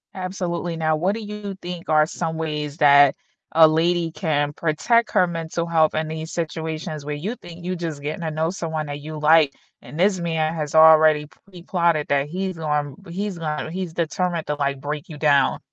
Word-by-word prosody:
Absolutely, 180 -2 -3
now, 155 -1 +1
what 180 +6 0
do 225 - -5
you 210 -1 -6
think 175 -3 -8
are 155 -1 +5
some 160 0 -4
ways 150 -2 -4
that 145 -2 +6 0.4
a 160 -1 +8
lady 165 +1 +1
can 145 -4 -1
protect 215 +10 +1
her 185 -3 +4
mental 165 0 -3
health 160 -2 +2
in 155 0 -1
these 160 +1 -6
situations 160 -2 -4
where 150 0 -3
you 200 +12 -4
think 170 -4 -12
you 185 0 -2
just 165 -4 -5
getting 150 +4 -4
to 165 - -2
know 160 +2 -1
someone 160 -4 -4
that 145 0 -5
you 155 +1 -7
like, 150 -1 +5 0.3
and 155 - -10
this 190 0 +3
man 160 -2 -1
has 155 -2 -4
already 155 -1 +7
pre-plotted 170 -3 -2
that 140 0 +1
he's 185 +1 -3
going 150 -3 -2
he's 195 +2 -4
going 155 -1 -3
he's 180 -2 -4
determined 170 0 -1
to, 150 - -1
like, 140 -1 -1
break 145 +1 -5
you 150 - -8
down? 145 -2 +3
160 Hz, 190 wpm, -22 LUFS, 150-175 Hz, 0.4 s, a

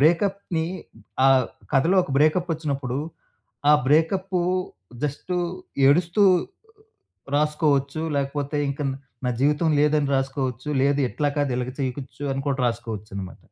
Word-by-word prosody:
బ్రేకప్‌ని 170 +1 +2 0.6
ఆహ్, 130 -2 +5 0.3
కథలో 160 +7 +3
ఒక - - -9
బ్రేకప్పొచ్చినప్పుడు, 150 -5 0 0.7
ఆ - - +8
బ్రేకప్పూ 180 +5 +2 0.6
జస్టూ 150 +5 -2 0.5
ఏడుస్తూ 170 +7 +3 1.1
రాసుకోవచ్చు, 150 -1 +1 0.2
లేకపోతే 140 +1 -2
ఇంక 145 +2 -4
న్ 135 - -3 0.3
నా - - +2
జీవితం 150 +4 +2
లేదని 150 -1 +2
రాసుకోవచ్చు, 135 -1 -2
లేదు 140 +1 +2
ఎట్లా 145 +7 -1
కాదు, 145 -2 +1
ఇలాగా 125 0 -3
చెయచ్చు 135 +2 -5
అని 135 - -3
కూడా 135 -1 -1
రాసుకోవచ్చనమాట. 105 -5 -6
145 Hz, 110 wpm, -24 LUFS, 135-160 Hz, 1.1 s, ఆ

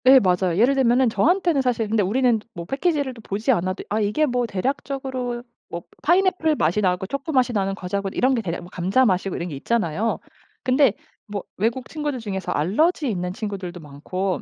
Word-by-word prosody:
네 265 +1 +8
맞아요. 180 -4 +1
예를 245 +5 +5
들면은 255 -1 +3
저한테는 325 - +2
사실 240 -4 0
근데 215 0 +2
우리는 235 +4 +2 0.2
뭐 170 -1 -6
패키지를 280 - 0
또 235 - -13
보지 210 +4 0
않아도 185 -4 0
'아 215 - 0
이게 210 +9 +2
뭐 245 -3 0
대략적으로 255 +2 -3 0.3
뭐 170 0 -5 0.2
파인애플 350 -2 +3
맛이 180 - +1
나고 180 -1 +1
초코 275 - -4
맛이 255 -3 +2
나는 195 -2 0
과자고 195 +1 -3
이런 260 +6 +2
게 240 - +1
대략 175 -5 -4
뭐 175 - -11
감자 190 +9 +2
맛이고' 190 -2 +1
이런 175 +1 -4
게 150 - -5
있잖아요. 215 +3 0 0.4
근데 260 -3 +4 0.3
뭐 205 -2 -4
외국 230 +5 -1
친구들 295 -3 -3
중에서 195 -4 -4
알러지 275 - +1
있는 180 -2 -2
친구들도 195 -4 -5
많고 175 +6 -3
225 Hz, 410 characters per minute, -23 LUFS, 185-265 Hz, 0.4 s, 네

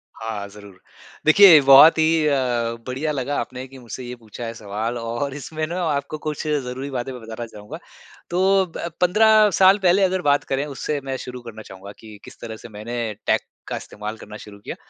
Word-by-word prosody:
हाँ, 110 -3 -5
ज़रूर। 100 -2 -14 0.5
देखिए, 165 +1 +8
बहुत 140 +4 +8
ही 160 0 +2
अ, 145 - +2 0.5
बढ़िया 135 +5 -2
लगा, 140 0 -3
आपने 130 +2 -6
कि 135 +1 -14
मुझसे 125 +1 -8
ये 125 0 -7
पूछा 115 0 -11
है 115 - -5
सवाल 110 +2 -4
और 120 +4 -3
इसमें 155 +2 -4
ना 175 +3 -4
आपको 145 +2 -3
कुछ 155 0 -5
ज़रूरी 135 -2 -3
बातें 130 0 -4
मैं 125 -2 -9
बताना 115 +1 -7
चाहूँगा। 105 -2 -10 0.5
तो 190 +2 +2
ब 170 - -4
15 215 +3 +5
साल 190 +2 +6
पहले 185 +2 +4
अगर 185 0 +1
बात 145 -3 +2
करें, 135 +2 -2
उससे 145 +1 -4
मैं 135 -1 -3
शुरू 125 0 -8
करना 115 -2 -10
चाहूँगा 100 -1 -11
कि 110 -2 -12
किस - - -14
तरह 115 -1 -7
से 120 - -12
मैंने 110 +1 -5
टेक - - +3 0.3
का - - -4
इस्तेमाल 105 +1 -7
करना 105 0 -11
शुरू 105 -1 -13
किया। - - -7
130 Hz, 195 wpm, -22 LUFS, 110-155 Hz, 0.5 s, देखिए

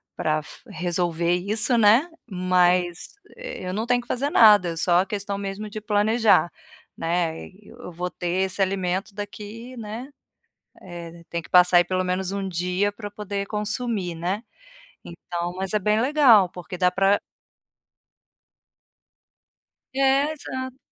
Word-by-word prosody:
para 155 0 -1
fu 185 +10 -14
resolver 175 -2 -1
isso, 210 +7 0
né, 230 +7 +5 0.2
mas 180 - +1 0.2
eu 480 - -6
não 220 +4 -2
tenho 245 0 +3
que - - -18
fazer 270 +4 -1
nada, 210 - +6
é 165 - -4
só 175 +1 +3
a 185 - +2
questão 200 0 -3
mesmo 200 +1 -5
de 215 +1 -7
planejar, 210 -3 +3 0.4
né. 165 -1 -2
Eu 210 +2 -13
vou 180 +1 -4
ter 175 - -5 0.2
esse 190 +1 -4
alimento 190 +1 -1
daqui, 210 +4 -8
né, 225 +3 -6 0.8
eh, 170 -1 -10
tem 170 0 -4
que - - -16
passar 180 0 +6
aí 175 - +4
pelo 185 +1 -1
menos 185 0 -1
1 195 -1 -3
dia 180 +3 -1
para 205 0 -8
poder 200 -1 -5
consumir, 210 -3 -2
né. 180 +7 -3 0.6
Então, 175 0 -5
mas 190 0 -3
é - - +5
bem 210 +2 +1
legal 250 -8 +5
porque 180 0 -9
dá 180 -1 +4
para 195 +2 +2 2.7
É, 275 +2 +2
exato. 260 -4 -6
195 Hz, 145 wpm, -24 LUFS, 180-215 Hz, 2.7 s, nada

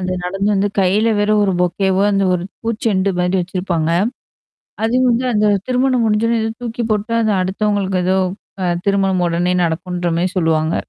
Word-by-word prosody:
அந்த 185 0 -2
நடந்து 195 +3 -1
வந்து 200 +1 +1
கையில 200 +4 +2
வேற 205 - +1
ஒரு 195 - +1
பொக்கேவோ 190 +2 +1
அந்த 195 - +1
ஒரு 175 - -2 0.2
பூச்செண்டு 215 -4 0
மாரி 180 +1 0
வச்சிருப்பாங்க. 175 -3 -2 0.9
அதுவும் 255 +3 +2
வந்து, 245 +2 0
அந்த 210 0 +2 0.2
திருமணம் 255 -1 +2
முடிஞ்சன்னே 225 +2 +1
ஏதோ 220 - -2
தூக்கி 235 0 -3
போட்டா 215 +2 -2
அது 215 - +2
அடுத்தவங்களுக்கு 195 -1 -1
ஏதோ 190 +1 +2 0.4
அ - - 0 0.2
திருமணம் 195 -2 +1
உடனே 175 +2 0
நடக்குன்ற 175 +2 -2
மாரி 180 +2 +1
சொல்லுவாங்க. 160 -1 +1
195 Hz, 160 wpm, -18 LUFS, 180-220 Hz, 0.9 s, கையில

